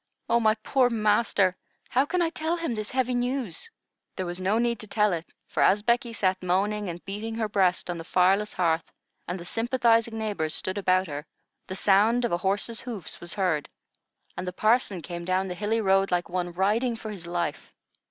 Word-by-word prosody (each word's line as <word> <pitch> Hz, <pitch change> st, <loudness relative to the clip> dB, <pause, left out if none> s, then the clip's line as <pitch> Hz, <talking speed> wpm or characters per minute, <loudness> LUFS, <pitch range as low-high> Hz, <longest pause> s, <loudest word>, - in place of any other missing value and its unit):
Oh, 235 Hz, -, +3 dB
my 220 Hz, -1 st, +3 dB
poor 250 Hz, +3 st, +2 dB
master! 210 Hz, -4 st, +2 dB, 0.3 s
How 265 Hz, +3 st, +2 dB
can 360 Hz, +1 st, +1 dB
I 325 Hz, -, 0 dB
tell 325 Hz, +1 st, -1 dB
him 330 Hz, -7 st, -2 dB
this 215 Hz, -2 st, -4 dB
heavy 255 Hz, -1 st, 0 dB
news?" 245 Hz, -, -2 dB, 0.5 s
There 185 Hz, -, -3 dB
was 175 Hz, +1 st, -4 dB
no 195 Hz, +4 st, +1 dB
need 235 Hz, -1 st, +1 dB
to 215 Hz, -, -8 dB
tell 210 Hz, -1 st, +2 dB
it; 165 Hz, -1 st, -4 dB, 0.2 s
for, -, -, -2 dB
as 205 Hz, +2 st, +4 dB
Becky 235 Hz, +1 st, +1 dB
sat 190 Hz, -4 st, 0 dB
moaning 200 Hz, +3 st, 0 dB
and 175 Hz, 0 st, -7 dB
beating 210 Hz, +3 st, -4 dB
her 225 Hz, -1 st, -1 dB
breast 190 Hz, -3 st, +2 dB
on 175 Hz, -1 st, -3 dB
the -, -, -6 dB
fireless 190 Hz, +4 st, +3 dB
hearth, 165 Hz, -2 st, 0 dB, 0.4 s
and 180 Hz, +2 st, -3 dB
the 170 Hz, -, -9 dB
sympathizing 230 Hz, 0 st, +2 dB
neighbors 205 Hz, -8 st, -2 dB
stood 190 Hz, +2 st, 0 dB
about 185 Hz, -1 st, +3 dB
her, 150 Hz, -1 st, -6 dB, 0.4 s
the 185 Hz, -, -5 dB
sound 210 Hz, +5 st, +3 dB
of -, -, -1 dB
a 175 Hz, -, +2 dB
horse's 200 Hz, +5 st, -1 dB
hoofs 225 Hz, -9 st, -7 dB
was 175 Hz, -, -7 dB
heard, 180 Hz, -7 st, 0 dB, 0.7 s
and 185 Hz, -, -5 dB
the 180 Hz, -, -3 dB
parson 215 Hz, -4 st, +2 dB
came 170 Hz, +1 st, -6 dB
down 185 Hz, +2 st, 0 dB
the 180 Hz, -, -3 dB
hilly 210 Hz, +5 st, 0 dB
road 195 Hz, -1 st, +3 dB
like 175 Hz, -1 st, 0 dB
one 175 Hz, 0 st, -2 dB
riding 215 Hz, +7 st, +1 dB
for 220 Hz, -1 st, -7 dB
his 180 Hz, -5 st, -7 dB
life. 170 Hz, -4 st, -3 dB
205 Hz, 200 wpm, -27 LUFS, 180-230 Hz, 0.7 s, as